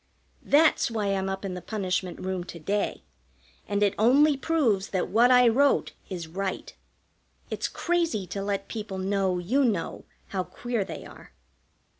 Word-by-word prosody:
That's 305 -1 +4
why 215 -3 -1
I'm 190 0 -1
up 195 +1 -4
in 190 - -3
the 180 - -6
punishment 185 -3 -2
room 185 -1 -3
to 175 - -9
day, 200 +6 -2 0.6
and 205 0 +1
it 200 -1 +3
only 280 +7 +5
proves 265 -10 +1
that 185 - -2
what 235 +4 +5
I 250 -1 +6
wrote 275 +5 +3 0.2
is 175 -4 -5
right. 190 +3 -4 0.8
It's - - -1
crazy 335 - -1
to 195 +3 -5
let 200 0 -2
people 210 -4 -5
know 190 -1 0
you 230 +11 +1
know 210 -9 -1 0.2
how 190 -2 -1
queer 240 +2 -3
they - - -8
are. - - -14
200 Hz, 160 wpm, -27 LUFS, 190-240 Hz, 0.8 s, I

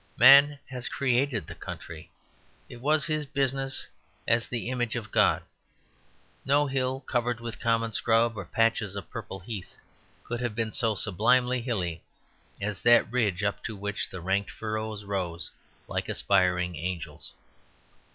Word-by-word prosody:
Man 140 +3 +8
has 125 -1 -4
created 130 -3 +1
the - - -8
country; 80 -2 -9 0.6
it 120 - -10
was 150 +3 +3
his 155 -2 0
business, 135 -1 0 0.4
as 115 0 +3
the 120 -2 -4
image 120 -2 -1
of 110 -3 -5
God. - - +3 1.0
No 145 +2 +3
hill, 130 -1 -1
covered 120 -2 -1
with 120 0 -6
common 115 -1 +1
scrub 115 +1 +2
or 100 - -5
patches 115 -1 +1
of 100 - -7
purple 105 -4 -6
heath, 100 -1 -7 0.5
could 120 0 -4
have 120 -3 -2
been 115 -1 -1
so 115 -3 +1
sublimely 120 +6 +3
hilly 90 -9 -2 0.6
as 100 -1 -3
that 120 -1 +5
ridge 105 -6 0
up 100 -2 -1
to 110 - -4
which 100 +1 -2
the 95 - -7
ranked 95 +3 0
furrows 110 -1 -4
rose 90 -5 -3 0.4
like - - -3
aspiring 90 -2 +2
angels. 85 +2 -4
115 Hz, 145 wpm, -28 LUFS, 100-125 Hz, 1.0 s, Man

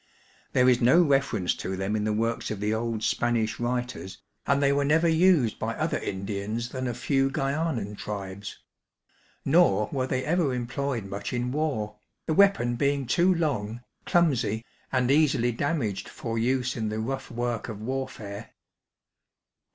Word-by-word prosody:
There 125 0 +4
is 125 -1 +4
no 125 +8 +6
reference 135 - +1
to 95 0 -4
them 95 +3 -1
in 105 -1 -1
the 110 - +1
works 115 +2 -1
of 105 - -4
the 105 +1 0
old 110 -1 -2
Spanish 115 -2 0
writers, 120 -5 -3 0.3
and 140 0 +3
they 140 0 +3
were 140 0 +2
never 160 +4 +3
used 160 - +3
by - - -2
other - - -1
Indians 100 +4 -3
than 130 0 -3
a 120 - -2
few 135 +2 +1
Gxuanan 135 -6 -1
tribes; 100 -1 -6 0.9
nor 135 - +4
were 130 -2 -1
they 130 0 -1
ever 155 -5 +1
employed 125 -1 -2
much 100 +3 -5
in 125 0 -1
war, 135 -8 -2 0.3
the 160 - 0
weapon 190 -11 +4
being 140 +1 +1
too 175 +10 +3
long, 125 - -1 0.3
clumsy, 125 - +2 0.3
and 130 -1 +2
easily 140 -5 +3
damaged 120 - -2
for 115 -1 -5
use 125 +1 0
in 110 -2 -2
the 110 - -3
rough 135 +4 -3
work 120 -1 -3
of 110 - -5
warfEure. 115 -4 -5
125 Hz, 160 wpm, -27 LUFS, 110-140 Hz, 0.9 s, no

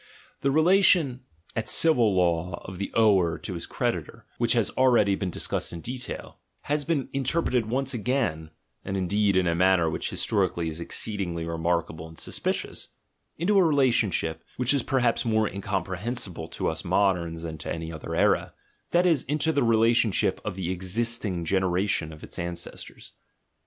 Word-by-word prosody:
The 140 - +2
relation 160 -3 +4 0.4
at 110 - -2
civil 120 -11 +5
law 85 -1 +1
of 95 -1 -8
the 100 - -3
ower 95 -7 +4
to 95 - -6
his 85 - -5
creditor - - -3
(which - - +2
has - - +1
ready 120 -6 +4
been 95 -1 -2
discussed - - -2
in 85 - -7
detail), 125 +4 -6 0.2
has 150 0 -1
been 145 -3 -1
interpreted 130 -3 0
once 135 +3 -1
again 110 - -1 0.3
(and 95 - -3
indeed 100 +1 +1
in 95 - +3
a 85 - +2
manner 90 -2 +3
which - - -2
historically 85 -1 0
is 80 +2 -7
ex - - -3
ceedingly 85 -6 -2
remarkable 85 -1 -2
and 80 0 -14
suspicious) - - -3 0.5
into 195 +5 +3
a - - +6
relationship, 120 - +1
which 125 +2 +2
is 140 - +2
perhaps 125 -2 +1
more 110 -2 +2
incomprehensible 95 -1 -3
to - - -3
us 80 0 -2
moderns 90 -3 +1
than 80 -2 -6
to - - -5
any 80 0 -4
other 80 - -6
era; - - +2 0.4
that 175 +1 +3
is, 165 -7 +3
into 150 +3 +1
the 145 - +1
relationship 115 -2 +2
of - - -4
the 90 -2 -3
existing 95 -1 -1
generation 95 -2 +1
to 80 - -9
its - - -7
ancestors. 85 0 -6
100 Hz, 160 wpm, -26 LUFS, 85-125 Hz, 0.5 s, a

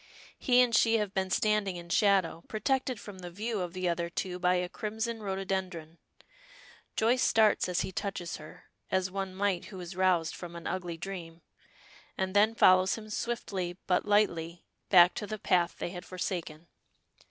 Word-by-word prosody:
He 250 -2 +5
and 240 -2 0
she 225 +1 +4
have 210 -2 -2
been 190 -1 -1
standing 205 -1 +1
in 170 0 -9
shadow, 195 -4 +2
protected 255 +2 -1
from 200 -3 -10
the 180 -1 -7
view 215 +4 -3
of 175 -1 -4
the 185 -1 -2
other 170 0 -1
two 180 +1 -4
by 180 0 +3
a 180 0 0
crimson 220 +4 -4
rhododendron. 190 -4 -4 1.0
Joyce 240 +3 +2
starts 220 -6 +3
as 180 - +1
he - - -3
touches 180 -4 -4
her, 155 0 -13 0.3
as 190 0 0
one 190 -1 -4
might 195 -2 0
who 190 - -9
is 175 0 -7
roused 180 -4 +2
from 175 -1 -8
an 170 - -8
ugly 175 -3 -3
dream, 170 -2 -7 0.7
and 190 +1 -2
then 215 +2 +4
follows 185 -2 +5
him 215 -1 -9
swiftly, 195 -7 -3
but 180 - +2
lightly, 175 -5 +1 0.2
back 180 -2 +7
to 210 - -5
the 215 - -4
path 175 -3 +1
they - - -4
had 180 -1 -7
forsaken. 175 -4 -5
185 Hz, 175 wpm, -30 LUFS, 175-210 Hz, 1.0 s, back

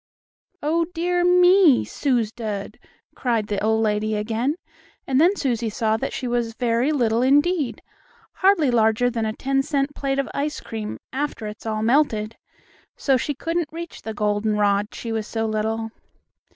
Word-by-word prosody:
"Oh, 330 +3 +1
dear 350 +1 +1
me 360 -4 +5
suz 240 -6 0
dud!" 215 -2 -5 0.3
cried 230 -4 0
the 205 -1 -3
old 220 +1 +2
lady 215 0 0
again, 225 +7 -1 0.5
and 265 +1 +2
then 360 +5 +4
Susie 240 - -1
saw 220 0 0
that - - -3
she 255 - -4
was 240 -2 -1
very 240 +3 +1
little 235 -5 +1
indeed, 290 +2 +2 0.5
hardly 375 -8 +4
larger 230 +1 +3
than 225 -2 -1
a 215 - -2
ten 270 +3 0
cent 280 0 -1
plate 275 -1 -2
of 275 - 0
ice 295 +1 -2
cream 215 -2 -6 0.2
after 275 -4 -3
it's 210 +1 -7
all 215 0 -1
melted. 230 -4 +1 0.6
So 270 - +2
she 280 +3 -1
couldn't 330 +2 -2
reach 335 +1 -8
the 220 -1 -6
goldenrod, 205 -1 +1
she 230 - -5
was 220 -1 -2
so 225 -1 -2
little. 220 +1 -2
240 Hz, 160 wpm, -23 LUFS, 220-290 Hz, 0.6 s, me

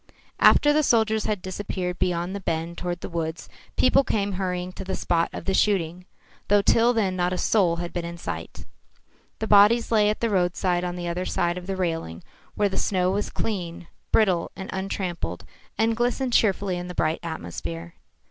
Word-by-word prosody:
After 295 0 +6
the 305 - +4
soldiers 220 -5 +2
had 205 -4 -2
disappeared 185 -1 -4
beyond 175 +1 -1
the - - -3
bend 165 -2 -3
toward 175 -1 -3
the - - -4
woods, 165 -1 -4 0.3
people 275 +2 +5
came 205 -5 -1
hurrying 180 -1 -3
to 185 - -8
the 190 0 -3
spot 170 -2 0
of - - -7
the 195 - 0
shooting, 180 -3 +1 0.4
though 205 0 +4
till 230 +4 +4
then 205 -6 0
not 180 0 0
a - - -2
soul 180 -4 +2
had 170 0 -5
been 175 - -2
in 170 0 -6
sight. - - -6 0.7
The 220 - -3
bodies 215 +3 +5
lay 210 -2 +4
at 215 - -1
the 230 -2 0
roadside 180 -1 +1
on 175 0 -3
the 175 -1 -4
other 175 +2 -2
side 175 0 0
of 180 0 -7
the 195 - -2
railing, 165 - -3 0.3
where 210 - +1
the 190 - -4
snow 185 -2 +1
was 205 +2 -1
clean, 175 -5 -4 0.2
brittle 185 -6 +3
and 190 - -7
untrampled 190 -2 -3 0.3
and 225 +1 +2
glistened 245 +2 0
cheerfully 195 -4 +2
in 175 0 -5
the 180 - -7
bright 155 0 0
atmosphere. 85 - -6
185 Hz, 190 wpm, -25 LUFS, 175-205 Hz, 0.7 s, After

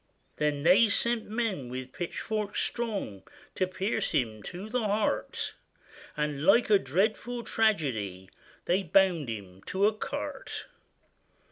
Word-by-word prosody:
Then 150 -1 0
they 185 +7 +7
sent 235 +1 +1
men 215 - -2
with 130 +1 -6
pitchforks 210 +4 -3
strong 205 - -2 0.3
To 185 - 0
pierce 195 +3 -1
him 110 -4 0
through 185 - -7
the 250 0 +1
heart; 210 0 0 0.6
And 150 -1 -1
like 215 +6 +5
a 205 - +7
dreadful 215 - 0
tragedy, 125 - 0 0.4
They 185 +3 +2
bound 180 -5 +3
him 95 -4 -7
to 195 +2 +2
a 215 - +4
cart. 215 - -5
190 Hz, 125 wpm, -29 LUFS, 140-215 Hz, 0.6 s, they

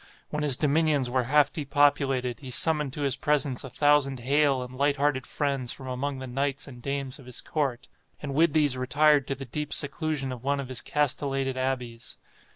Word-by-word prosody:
When 150 - -2
his 145 -4 +2
dominions 150 -3 +1
were 125 -1 +1
half 145 +3 +3
depopulated, 140 -4 +1
he 135 - -9
summoned 150 +1 +2
to 150 - -5
his 140 -3 +1
presence 145 -3 0
a 135 - -7
thousand 145 -2 +2
hale 140 0 +2
and 125 +1 -10
light 140 +2 +2
hearted 140 -2 0
friends 135 -4 -1
from 130 - -8
among 135 +2 -3
the 130 - -6
knights 135 +3 -2
and 125 -3 -11
dames 140 0 -3
of 130 - -14
his 125 - -3
court, 135 -6 -2 0.3
and 145 -2 -5
with 155 +1 +3
these 145 -4 +3
retired 140 +2 +3
to 135 - -2
the 135 0 -8
deep 150 +4 -5
seclusion 145 -2 0
of 125 -1 -8
one 140 +1 0
of 135 -2 -5
his 130 -2 0
castellated 135 -2 -1
abbeys. 125 -3 -3
140 Hz, 195 wpm, -27 LUFS, 130-145 Hz, 0.3 s, half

